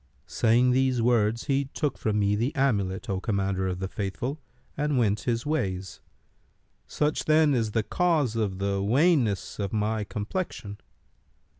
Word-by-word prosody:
Saying 120 Hz, +2 st, +3 dB
these 130 Hz, -1 st, +2 dB
words, 115 Hz, -1 st, +2 dB
he 140 Hz, -1 st, 0 dB
took 140 Hz, +1 st, -2 dB
from 105 Hz, -1 st, -1 dB
me 100 Hz, 0 st, +2 dB
the 120 Hz, +9 st, -1 dB
amulet, 100 Hz, -9 st, 0 dB
O 95 Hz, -1 st, -1 dB
Commander 95 Hz, -2 st, -1 dB
of 90 Hz, -1 st, -2 dB
the 95 Hz, +1 st, -3 dB
Faithful, 105 Hz, -, -4 dB, 0.3 s
and 145 Hz, -1 st, 0 dB
went 105 Hz, -4 st, +2 dB
his 115 Hz, 0 st, -2 dB
ways. 95 Hz, -11 st, -2 dB, 0.9 s
Such, 150 Hz, 0 st, -1 dB
then, 155 Hz, -1 st, +4 dB
is 110 Hz, -4 st, 0 dB
the 115 Hz, -, +1 dB
cause 150 Hz, -, +1 dB
of 105 Hz, -4 st, -1 dB
the 100 Hz, 0 st, -1 dB
wanness 120 Hz, -, +2 dB
of 100 Hz, -2 st, -2 dB
my 110 Hz, 0 st, 0 dB
complexion. 105 Hz, -, -5 dB
110 Hz, 150 wpm, -27 LUFS, 100-135 Hz, 0.9 s, then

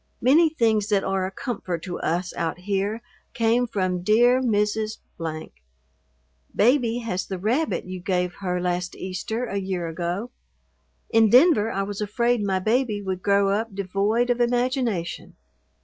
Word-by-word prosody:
Many 310 Hz, +7 st, +5 dB
things 220 Hz, -8 st, +1 dB
that 205 Hz, -2 st, +1 dB
are 190 Hz, -1 st, -1 dB
a -, -, -7 dB
comfort 190 Hz, -6 st, -4 dB
to 175 Hz, -, -5 dB
us 175 Hz, +2 st, -2 dB
out 165 Hz, 0 st, -2 dB
here 200 Hz, +4 st, -2 dB, 0.3 s
came 235 Hz, +2 st, +2 dB
from 185 Hz, -5 st, -1 dB
dear 240 Hz, +6 st, +4 dB
Mrs.. 215 Hz, -2 st, 0 dB, 1.6 s
Baby 240 Hz, 0 st, +3 dB
has 190 Hz, -5 st, -3 dB
the 190 Hz, -, -4 dB
rabbit 240 Hz, -, 0 dB
you 185 Hz, 0 st, -6 dB
gave 180 Hz, -1 st, -1 dB
her 180 Hz, -2 st, -1 dB
last 180 Hz, 0 st, -2 dB
Easter 195 Hz, +6 st, -4 dB
a 200 Hz, -, -4 dB
year 190 Hz, -3 st, -2 dB
ago. 175 Hz, +8 st, -3 dB, 0.8 s
In 225 Hz, -1 st, +5 dB
Denver 250 Hz, -, +5 dB
I 195 Hz, -, -1 dB
was 205 Hz, +1 st, -5 dB
afraid 235 Hz, +3 st, +1 dB
my 195 Hz, -2 st, +1 dB
baby 220 Hz, +2 st, 0 dB
would 190 Hz, -2 st, -4 dB
grow 200 Hz, 0 st, +3 dB
up 210 Hz, 0 st, -2 dB
devoid 200 Hz, +5 st, 0 dB
of 245 Hz, 0 st, 0 dB
imagination. 240 Hz, -, -1 dB
205 Hz, 150 wpm, -24 LUFS, 185-235 Hz, 1.6 s, Many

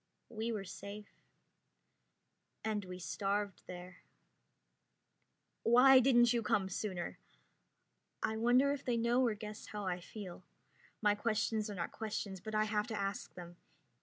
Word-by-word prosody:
We 230 Hz, 0 st, -3 dB
were 210 Hz, -3 st, -2 dB
safe. 200 Hz, +2 st, -8 dB, 1.6 s
And 210 Hz, -2 st, -1 dB
we 180 Hz, 0 st, -7 dB
starved 200 Hz, +2 st, -2 dB
there. 180 Hz, 0 st, -8 dB, 1.6 s
"Why 255 Hz, +3 st, +8 dB
didn't 240 Hz, -2 st, +5 dB
you 235 Hz, -, +1 dB
come 195 Hz, -3 st, +1 dB
sooner?" 185 Hz, -2 st, -4 dB, 1.0 s
I 220 Hz, -, +1 dB
wonder 245 Hz, +5 st, +4 dB
if 280 Hz, -, -5 dB
they 245 Hz, -2 st, 0 dB
know 235 Hz, +2 st, +3 dB
or 230 Hz, -4 st, +2 dB
guess 210 Hz, 0 st, -8 dB
how 210 Hz, -1 st, -5 dB
I 180 Hz, -1 st, -1 dB
feel. 185 Hz, -1 st, -9 dB, 0.6 s
My 210 Hz, -1 st, +5 dB
questions 215 Hz, 0 st, 0 dB
are 205 Hz, -, -5 dB
not 170 Hz, -2 st, -3 dB
questions, 205 Hz, -3 st, -4 dB
but 220 Hz, +2 st, -5 dB
I 215 Hz, -, +4 dB
have 210 Hz, 0 st, 0 dB
to 220 Hz, -3 st, -3 dB
ask 195 Hz, +1 st, -3 dB
them. 175 Hz, -1 st, -10 dB
210 Hz, 140 wpm, -35 LUFS, 195-230 Hz, 1.6 s, Why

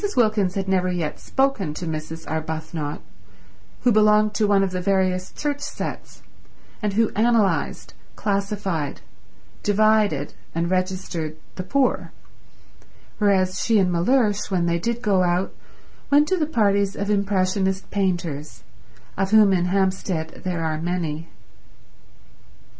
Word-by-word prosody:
Wilkins 215 Hz, -5 st, +2 dB
had 195 Hz, -1 st, -2 dB
never 185 Hz, -1 st, +1 dB
yet 165 Hz, -4 st, -3 dB
spoken 265 Hz, -, 0 dB
to 175 Hz, -, -5 dB
Mrs. 160 Hz, 0 st, -5 dB
Arbuthnot, 160 Hz, -1 st, -4 dB, 0.8 s
who 245 Hz, -, +4 dB
belonged 215 Hz, 0 st, +4 dB
to 210 Hz, 0 st, +1 dB
one 200 Hz, -1 st, +4 dB
of 190 Hz, -, -1 dB
the 185 Hz, 0 st, -2 dB
various 185 Hz, -1 st, +1 dB
church 290 Hz, -1 st, -3 dB
sets, -, -, -6 dB, 0.6 s
and 210 Hz, -2 st, -1 dB
who 225 Hz, +2 st, +2 dB
analysed, 220 Hz, -2 st, +1 dB, 0.2 s
classified, 195 Hz, -6 st, -2 dB, 0.6 s
divided 205 Hz, -8 st, +2 dB, 0.2 s
and 170 Hz, +1 st, 0 dB
registered 185 Hz, -4 st, -2 dB, 0.2 s
the -, -, -5 dB
poor; 255 Hz, +7 st, 0 dB, 1.1 s
whereas 190 Hz, -3 st, +2 dB
she 225 Hz, -2 st, +3 dB
and 185 Hz, -3 st, +3 dB
Mellersh, 205 Hz, +4 st, +2 dB
when 180 Hz, -3 st, +1 dB
they 170 Hz, 0 st, +1 dB
did 235 Hz, +6 st, -2 dB
go 195 Hz, -3 st, +3 dB
out, 180 Hz, +1 st, +1 dB, 0.6 s
went 290 Hz, +1 st, +5 dB
to 375 Hz, -, +3 dB
the 305 Hz, -3 st, 0 dB
parties 200 Hz, -7 st, +2 dB
of 200 Hz, +1 st, -2 dB
impressionist 190 Hz, -1 st, 0 dB
painters, 175 Hz, -7 st, -2 dB, 0.5 s
of 195 Hz, 0 st, 0 dB
whom 210 Hz, -2 st, +6 dB
in 175 Hz, -1 st, +2 dB
Hampstead 185 Hz, -3 st, -1 dB
there 175 Hz, -3 st, -2 dB
were 155 Hz, -1 st, -2 dB
many. 165 Hz, -2 st, -2 dB
190 Hz, 130 wpm, -23 LUFS, 175-210 Hz, 1.1 s, whom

